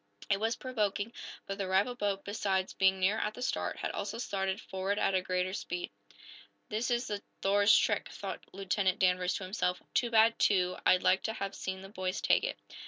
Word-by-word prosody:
It 195 Hz, -, +3 dB
was 225 Hz, +2 st, 0 dB
provoking, 215 Hz, -3 st, -2 dB, 0.3 s
but 195 Hz, +1 st, -5 dB
the 195 Hz, -, -1 dB
rival 195 Hz, +6 st, +2 dB
boat, 205 Hz, -4 st, -2 dB
besides 195 Hz, -2 st, -1 dB
being 190 Hz, 0 st, +3 dB
nearer 200 Hz, +4 st, +2 dB
at 210 Hz, -, -2 dB
the 250 Hz, -, -5 dB
start, -, -, -1 dB
had -, -, -3 dB
also 225 Hz, -, -4 dB
started 195 Hz, -4 st, -2 dB
forward 190 Hz, +2 st, -2 dB
at 190 Hz, -3 st, +2 dB
greater 185 Hz, 0 st, -1 dB
speed. 360 Hz, -, -4 dB, 0.8 s
"This 220 Hz, +4 st, -1 dB
is 240 Hz, 0 st, +1 dB
the 205 Hz, -3 st, -3 dB, 0.2 s
'Thor's' 205 Hz, +1 st, +5 dB
trick," -, -, +1 dB
thought -, -, -6 dB
Lieutenant 195 Hz, 0 st, 0 dB
Danvers 180 Hz, -1 st, +2 dB
to -, -, -4 dB
himself. 185 Hz, -1 st, -1 dB
"Too 240 Hz, -, +2 dB
bad, 225 Hz, 0 st, +4 dB
too. 180 Hz, -2 st, +3 dB
I'd 185 Hz, -, +5 dB
like 190 Hz, -, +4 dB
to 220 Hz, -, -1 dB
have 195 Hz, -2 st, -4 dB
seen 190 Hz, 0 st, -4 dB
the 195 Hz, -, -10 dB
boys 185 Hz, -2 st, -3 dB
take -, -, +3 dB
it." -, -, -2 dB
195 Hz, 195 wpm, -31 LUFS, 190-215 Hz, 0.8 s, Thor's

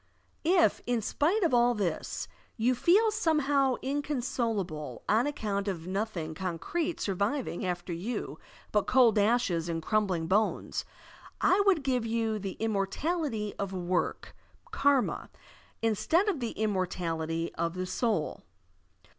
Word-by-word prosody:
If, 340 Hz, +1 st, +3 dB
in 245 Hz, -1 st, +2 dB
spite 355 Hz, -, +1 dB
of 330 Hz, -, +2 dB
all 240 Hz, 0 st, +4 dB
this, 185 Hz, -6 st, -2 dB, 0.3 s
you 240 Hz, +3 st, +3 dB
feel 405 Hz, -, +4 dB
somehow 290 Hz, -, +2 dB
incon 280 Hz, -1 st, -1 dB
solable 185 Hz, -, -2 dB
on 225 Hz, +6 st, +3 dB
account 210 Hz, -8 st, -2 dB
of 170 Hz, -5 st, -3 dB
nothing 185 Hz, -4 st, -3 dB
concrete 190 Hz, -, -2 dB
surviving 200 Hz, +3 st, -1 dB
after 175 Hz, 0 st, -3 dB
you 195 Hz, +9 st, -4 dB, 0.3 s
but 210 Hz, -1 st, +1 dB
cold 240 Hz, -5 st, +5 dB
ashes 200 Hz, -6 st, +2 dB
and 165 Hz, -1 st, -1 dB
crumbling 190 Hz, -2 st, 0 dB
bones, 205 Hz, +6 st, 0 dB, 0.5 s
I 380 Hz, +2 st, +4 dB
would 355 Hz, -7 st, +4 dB
give 255 Hz, -3 st, +1 dB
you 225 Hz, -1 st, -1 dB
the 195 Hz, -2 st, -4 dB
immortality 220 Hz, -, -1 dB
of 195 Hz, -1 st, -3 dB
work 180 Hz, -1 st, -2 dB, 0.4 s
(karma) 280 Hz, -3 st, +1 dB, 0.5 s
instead 320 Hz, -, +2 dB
of 380 Hz, -8 st, 0 dB
the 235 Hz, -3 st, -3 dB
immortality 170 Hz, -5 st, -2 dB
of 170 Hz, +1 st, -2 dB
the 185 Hz, 0 st, -2 dB
soul. 185 Hz, -2 st, -1 dB
220 Hz, 130 wpm, -29 LUFS, 185-270 Hz, 0.5 s, cold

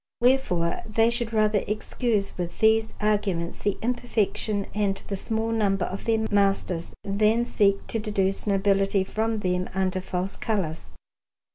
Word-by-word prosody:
Wherefore 240 Hz, -10 st, +2 dB
they 225 Hz, +2 st, +3 dB
should 235 Hz, -1 st, -1 dB
rather 215 Hz, -2 st, +2 dB
excuse 210 Hz, -1 st, -1 dB
with 175 Hz, -1 st, -4 dB
these 220 Hz, 0 st, +3 dB
arguments 200 Hz, -5 st, 0 dB
the 205 Hz, -, -1 dB
imperfection 220 Hz, -4 st, 0 dB
and 205 Hz, -2 st, +1 dB
the 200 Hz, -, -1 dB
small 220 Hz, +3 st, -2 dB
number 195 Hz, -5 st, +1 dB
of 195 Hz, -, -6 dB
their 225 Hz, -1 st, +1 dB
masters, 195 Hz, -4 st, +1 dB
than 215 Hz, +4 st, +2 dB
seek 200 Hz, -4 st, +2 dB
to 225 Hz, -, -1 dB
deduce 200 Hz, -2 st, -1 dB
nobility 195 Hz, 0 st, +2 dB
from 220 Hz, +2 st, -2 dB
them 180 Hz, -1 st, -1 dB
under 185 Hz, -1 st, 0 dB
false 185 Hz, +1 st, -3 dB
colours. 185 Hz, -8 st, -2 dB
205 Hz, 140 wpm, -25 LUFS, 195-220 Hz, -, they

